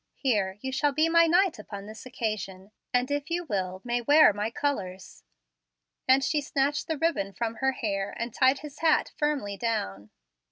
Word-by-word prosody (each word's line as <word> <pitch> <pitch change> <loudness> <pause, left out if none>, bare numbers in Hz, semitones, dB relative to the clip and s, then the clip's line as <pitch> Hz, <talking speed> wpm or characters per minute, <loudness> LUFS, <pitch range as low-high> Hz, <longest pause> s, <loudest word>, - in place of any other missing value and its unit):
Here, 205 -8 0
you 265 - -4
shall 285 +2 +1
be 310 +3 +3
my 335 0 +5
knight 355 - +3
upon 200 -1 -8
this 220 +4 -10
occasion, 205 -5 -4 0.2
and, 250 +2 +1
if 290 +2 -2
you 345 +1 -1
will, 190 - -3
may 240 0 -1
wear 290 -1 +6
my 210 +2 -2
colors;" 200 -9 -4 0.8
and 265 +1 +5
she 300 +1 +1
snatched 285 +1 -1
the 320 - -2
ribbon 280 -11 0
from 230 +2 -3
her 265 +1 +1
hair, 200 -5 -3
and 235 -1 -4
tied 265 +1 +3
his 295 -1 -10
hat 320 -1 +2
firmly 280 -10 -1
down. 105 - -3
245 Hz, 175 wpm, -27 LUFS, 205-290 Hz, 0.8 s, wear